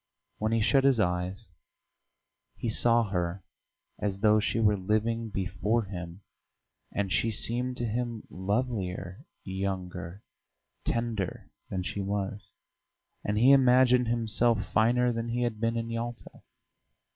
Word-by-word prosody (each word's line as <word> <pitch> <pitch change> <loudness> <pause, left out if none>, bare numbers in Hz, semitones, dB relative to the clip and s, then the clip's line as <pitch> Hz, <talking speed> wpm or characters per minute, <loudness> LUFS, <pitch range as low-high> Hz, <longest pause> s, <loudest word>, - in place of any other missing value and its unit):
When 110 +1 0
he 115 -1 +2
shut 135 +5 +4
his 135 -4 +4
eyes 90 +1 -1 1.1
he 120 - -2
saw 115 +1 +3
her 90 0 -2 0.6
as 100 -2 -1
though 110 0 +5
she 115 +2 0
were 105 -2 +4
living 110 +4 0
before 100 +4 0
him, 90 -2 -7 0.7
and 100 -2 -2
she 115 - +2
seemed 125 +4 0
to 120 - -1
him 115 0 -3
lovelier, 95 -3 -3 0.2
younger, 95 -1 -4 0.6
tenderer 115 -5 -2 0.2
than 95 -1 -2
she 100 - -3
was; 100 +1 -3 0.7
and 105 +1 -1
he 125 +5 +6
imagined 125 -2 +5
himself 115 -2 +2
finer 120 +4 +2
than 115 0 -3
he 120 +1 0
had 115 -3 -2
been 115 0 +1
in 115 0 -3
Yalta. 115 0 -5
110 Hz, 130 wpm, -29 LUFS, 95-120 Hz, 1.1 s, he